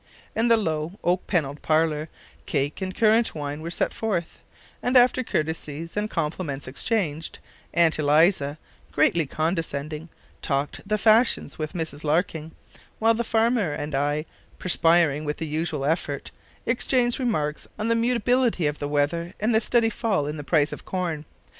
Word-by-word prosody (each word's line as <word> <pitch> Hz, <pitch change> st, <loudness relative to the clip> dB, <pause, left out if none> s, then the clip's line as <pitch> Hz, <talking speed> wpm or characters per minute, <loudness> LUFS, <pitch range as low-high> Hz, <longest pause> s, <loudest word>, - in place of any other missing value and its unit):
In 225 Hz, +2 st, +2 dB
the 230 Hz, -1 st, +5 dB
low, 160 Hz, -4 st, -2 dB
oak 180 Hz, +1 st, +1 dB
panelled 150 Hz, -6 st, -1 dB
parlour, 155 Hz, -1 st, +1 dB, 0.4 s
cake 145 Hz, +4 st, -1 dB
and 185 Hz, 0 st, -3 dB
currant 225 Hz, -1 st, +3 dB
wine 145 Hz, 0 st, -4 dB
were 165 Hz, -, -5 dB
set 170 Hz, -, -1 dB
forth, 195 Hz, -7 st, -2 dB, 0.4 s
and 250 Hz, +1 st, +3 dB
after 250 Hz, +1 st, +5 dB
courtesies 160 Hz, -, -3 dB
and 210 Hz, +1 st, -1 dB
compliments 150 Hz, -5 st, -3 dB
exchanged, 160 Hz, -, -2 dB, 0.4 s
Aunt 170 Hz, -2 st, +4 dB
Eliza, 150 Hz, 0 st, +3 dB, 0.3 s
greatly 165 Hz, -4 st, +2 dB
condescending, 155 Hz, -1 st, -2 dB, 0.3 s
talked 140 Hz, +1 st, -2 dB
the 215 Hz, -, +2 dB
fashions 225 Hz, 0 st, +3 dB
with 155 Hz, +2 st, -3 dB
Mrs 160 Hz, -4 st, -4 dB
Larkin; 160 Hz, 0 st, 0 dB, 0.4 s
while 225 Hz, +1 st, +4 dB
the 235 Hz, +1 st, -1 dB
farmer 225 Hz, -6 st, +1 dB
and 150 Hz, 0 st, -4 dB
I, 145 Hz, +3 st, 0 dB, 0.3 s
perspiring 165 Hz, -4 st, +3 dB
with 150 Hz, 0 st, -3 dB
the 165 Hz, -, -3 dB
unusual 155 Hz, -2 st, -2 dB
effort, 145 Hz, -2 st, -1 dB, 0.3 s
exchanged 245 Hz, +1 st, +2 dB
remarks 155 Hz, -, -1 dB
on 215 Hz, -, -2 dB
the 230 Hz, -, +3 dB
mutability 240 Hz, -4 st, +2 dB
of 145 Hz, 0 st, -1 dB
the 145 Hz, -, -3 dB
weather 150 Hz, +4 st, 0 dB
and 220 Hz, +3 st, +1 dB
the 220 Hz, -, +4 dB
steady 230 Hz, 0 st, +2 dB
fall 210 Hz, -10 st, 0 dB
in 150 Hz, +1 st, -3 dB
the 150 Hz, -, -6 dB
price 150 Hz, -1 st, +2 dB
of -, -, -7 dB
corn. 170 Hz, -5 st, -3 dB
165 Hz, 155 wpm, -25 LUFS, 150-215 Hz, 0.4 s, the